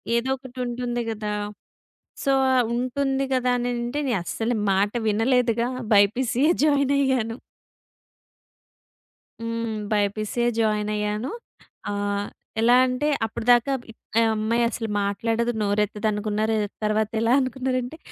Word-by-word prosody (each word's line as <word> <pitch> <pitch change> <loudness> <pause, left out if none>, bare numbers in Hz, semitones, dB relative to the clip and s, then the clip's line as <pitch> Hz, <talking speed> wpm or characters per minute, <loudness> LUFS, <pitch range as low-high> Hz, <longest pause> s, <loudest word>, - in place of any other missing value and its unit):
ఏదో 235 +3 0
ఒకటి 260 -1 -13
ఉంటుంది 240 0 -2
గదా, 210 -1 -3 0.9
సో, 275 - +3 0.2
ఆ - - +4 0.2
ఉంటుంది 270 +2 0
గదా 250 -1 +2
అని 245 0 -1
అంటే, 240 +5 -2
నేను 240 - +1
అస్సలు 225 +6 -1 0.2
మాట 200 +2 +2 0.2
వినలేదుగా 235 +2 +2 0.3
బైపీసియ్యే 240 - +3
జాయినయ్యాను. 275 -5 +2 2.0
హ్మ్. 230 -1 -3 0.2
బైపీసిసే 215 +3 0
జాయినయ్యాను. 210 +2 0 0.6
ఆహ్, 205 0 -1 0.3
ఎలా 240 +2 +5
అంటే, 255 +4 -1 0.2
అప్పడదాకా 240 +4 +2 0.5
ఆ - - +5
అమ్మాయి 230 +2 +1
అసలు 225 -1 -4
మాట్లాడదు 225 +4 0
నోరెత్తదనుకున్నారు 210 +1 0 0.3
తర్వాత 215 0 +1
ఎలా 230 +2 +3
అనుకున్నారంటే 255 +2 -2
230 Hz, 105 wpm, -24 LUFS, 215-250 Hz, 2.0 s, ఎలా